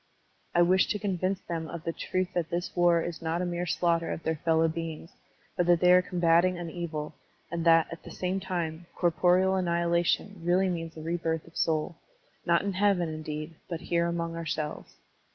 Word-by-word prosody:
I 175 - +6
wished 185 +2 +3
to - - 0
convince 190 -2 -1
them 165 -1 -4
of 160 +1 -7
the 165 - -2
truths 185 +2 -2
that 170 -2 -1
this 175 0 -3
war 175 -2 +4
is 170 -1 -5
not 165 +1 -1
a 180 - -1
mere 175 0 -2
slaughter 170 -1 +1
of - - -4
their 160 -1 -1
fellow 165 +1 +2
beings, 165 +1 -5 0.4
but 175 - +1
that 175 -1 +5
they 180 +1 +6
are 180 - +7
combating 175 0 +2
an 170 -2 -5
evil, 155 -3 -4 0.4
and 170 -1 -2
that, 165 -1 +6
at 170 - -7
the - - -11
same 185 +1 -2
time, 175 -3 -4
corporeal 180 +2 +3
annihilation 170 +2 0
really 180 +2 +3
means 165 -2 -4
a 155 - -7
rebirth 165 -1 -2
of 165 - -18
soul, 160 +1 0 0.5
not 170 +1 +3
in 200 -1 -1
heaven, 190 -3 +2
indeed, 155 0 -5 0.2
but 170 -1 -4
here 170 -1 +1
among 170 -1 -2
ourselves. 155 -2 -4
170 Hz, 190 wpm, -28 LUFS, 165-180 Hz, 0.5 s, are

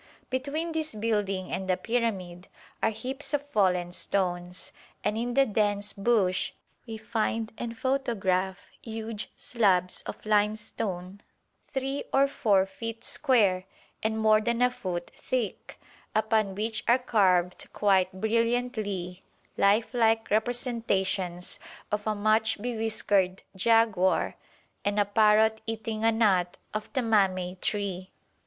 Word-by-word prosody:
Between 290 +6 -2
this 315 -6 -2
building 205 -4 -1
and 190 0 -3
the 185 - +2
pyramid 190 -5 -2 0.3
are - - +3
heaps 265 +7 -1
of 285 0 -3
fallen 180 -7 +2
stones, 180 -1 -1 0.3
and 210 - 0
in 240 +2 -2
the 275 0 +5
dense 205 -2 0
bush 200 -3 +1 0.3
we 225 -1 -5
find 220 0 -2
and 230 -1 -5
photograph 200 -8 0 0.2
huge 225 -1 -6
slabs 185 -6 +2
of - - -4
limestone 205 -3 -1 0.5
3 270 +1 -3
or 275 +1 +4
4 200 -8 +2
feet 225 +4 -7
square 200 -8 +2 0.4
and 220 0 -1
more 215 -1 +4
than 235 +2 +1
a 250 - +4
foot 175 -7 -5
thick, 245 -6 -4 0.4
upon 215 -2 +1
which 220 +2 -2
are 240 - +6
carved 185 -8 +2
quite 190 -3 +2
brilliantly 215 -3 -1 0.3
lifelike 225 +2 +2
representations 215 -6 0 0.3
of 210 +1 -2
a 215 - +1
much 220 +2 +2
bewhiskered 210 -5 0
jaguar 215 -2 +3 0.5
and 205 +1 0
a 205 - +4
parrot 215 +1 +4
eating 220 0 -3
a 225 - +5
nut 195 -6 +2 0.2
of 215 0 -4
the 260 - 0
mamey 190 -5 +2
tree. 195 -3 -2
215 Hz, 120 wpm, -28 LUFS, 190-230 Hz, 0.5 s, are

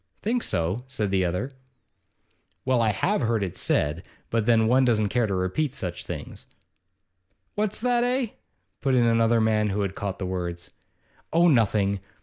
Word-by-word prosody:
'Think 235 +3 0
so?' 90 - -1
said 110 -6 -2
the 95 -1 +2
other. 90 +10 -2 1.1
'Well, 130 -2 +2
I 110 - +3
have 185 - 0
heard 115 -3 +1
it 95 - -4
said 75 +4 0 0.3
but 115 -1 0
then 115 -2 +4
one 130 +4 +4
doesn't 110 -4 +2
care 120 0 +1
to 100 - -1
repeat 125 +11 -1
such 90 -7 -5
things.' - - -7 1.1
'What's 210 0 -1
that, 240 0 +2
eh?' 250 -1 0 0.5
put 135 -1 +2
in 120 -2 +4
another 115 0 +3
man, 110 -1 +2
who 100 +1 -1
had 100 -2 -2
caught 100 -1 -4
the 95 - -4
words. 90 -2 -4 0.6
'Oh, 170 +2 +4
nothing. 105 - +2
110 Hz, 165 wpm, -25 LUFS, 95-130 Hz, 1.1 s, then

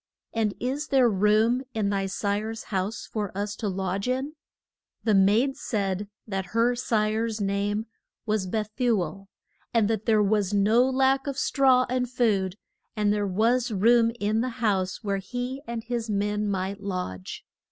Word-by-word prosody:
And 220 -3 0
is 270 +5 -2
there 265 -3 +4
room 215 +4 +3
in 205 -2 0
thy 195 -1 0
sire's 210 +3 -2
house 190 +3 -2
for 210 -3 -3
us 205 0 -2
to 220 - -3
lodge 190 +1 -2
in? 265 +4 -1 0.7
The 220 - +2
maid 210 +8 +4
said 200 -7 -2 0.2
that 195 0 -4
her 240 +2 +3
sire's 220 -1 0
name 205 +2 -1 0.4
was 210 -4 0
Beth 215 +2 -2
u 240 -4 +3
el, 195 +4 -8 0.5
and 225 -3 +4
that 220 0 -2
there 215 -2 +4
was 205 -1 +1
no 220 +6 +4
lack 265 +1 +2
of 275 -1 -3
straw 260 -3 +3
and 250 0 -1
food, 205 -7 +1 0.4
and 210 -1 +2
there 205 -1 0
was 230 +6 +2
room 230 +3 +4
in 215 +2 +1
the 255 - -1
house 195 -4 0
where 200 -1 0
he 245 +6 -4
and 235 -1 -4
his 235 -1 -3
men 210 +1 0
might 195 +1 -2
lodge. 180 - -5
215 Hz, 165 wpm, -26 LUFS, 200-240 Hz, 0.7 s, there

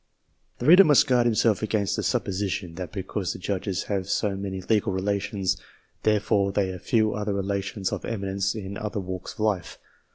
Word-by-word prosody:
The 120 - -5
reader 180 +6 +9
must 150 -6 +5
guard 125 -2 +3
himself 110 -2 +2
against 105 -2 0
the - - -1
supposition, 95 -2 -1
that 90 0 -6
because 95 -1 -3
the - - -7
Judges 95 0 -2
have 100 -2 -3
so 100 0 0
many 95 -1 -4
legal 105 0 +1
relations, 100 0 -1 0.4
therefore 105 -2 +2
they 95 -1 0
have 90 -1 -6
few 110 -3 +2
other 105 -1 -2
relations 100 0 -2
of - - -3
eminence 100 -2 -2
in 100 -2 -5
other 105 -1 -3
walks 95 -1 -5
of - - -9
life. 105 -5 -1
100 Hz, 175 wpm, -26 LUFS, 95-105 Hz, 0.4 s, reader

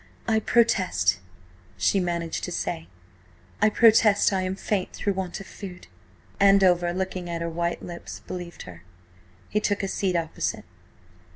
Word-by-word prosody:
"I 220 -1 +3
protest," 190 - +2 0.6
she 195 - +2
managed 170 -2 -2
to 180 - -6
say, 165 -1 -3 0.7
"I 215 - +6
protest, 215 -2 +5
I 190 - +1
am 185 0 -2
faint 195 -1 -2
through 200 - -1
want 185 -2 -4
of 195 - -9
food." 185 -3 -9 0.5
Andover, 190 -3 +5
looking 185 -1 -3
at 170 -1 -3
her 170 - -2
white 170 +1 -2
lips, 170 -1 -8
believed 175 -1 -7
her. 85 -3 -11 0.7
He 210 - 0
took 205 -1 -1
a - - 0
seat 190 -1 -1
opposite. 165 -2 -2
185 Hz, 150 wpm, -25 LUFS, 170-200 Hz, 0.7 s, I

